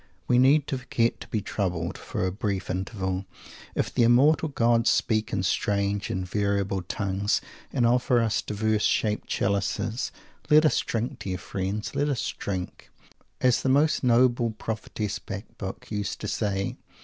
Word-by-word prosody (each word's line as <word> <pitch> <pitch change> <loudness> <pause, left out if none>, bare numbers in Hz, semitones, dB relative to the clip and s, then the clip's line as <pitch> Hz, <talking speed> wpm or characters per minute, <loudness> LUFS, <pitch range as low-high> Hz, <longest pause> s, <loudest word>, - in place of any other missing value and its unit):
We 125 - +4
need 140 +3 +5
to 135 - -3
forget 120 -2 0
to - - -9
be 110 - -1
troubled, 90 -4 -2
for - - -3
a 95 - 0
brief 95 -2 -2
interval, 95 0 -3 0.5
if - - -1
the - - +2
Immortal 145 +7 +5
Gods 115 -3 +3
speak 110 -1 +1
in 95 -3 0
strange 100 +1 0
and 95 -4 -2
variable 100 -1 0
tongues, 100 +3 -1 0.3
and 125 -4 +2
offer 125 +1 +3
us 115 -2 +1
diverse 110 0 0
shaped 105 0 +1
chalices. 100 +4 -1 0.4
Let 155 +1 +7
us 155 - +3
drink, 115 +1 -2
dear 95 -1 -3
friends, 95 +3 -4
let 145 +1 +1
us 135 -5 -1
drink, 95 -2 -5 0.5
as 125 -2 +3
the 130 - 0
most 145 +3 +3
noble 120 -1 +4
prophetess 110 -1 -4
Bacbuc 100 -1 -7
used 105 -2 -3
to - - -3
say! 100 -2 -1
110 Hz, 155 wpm, -26 LUFS, 100-120 Hz, 0.5 s, Let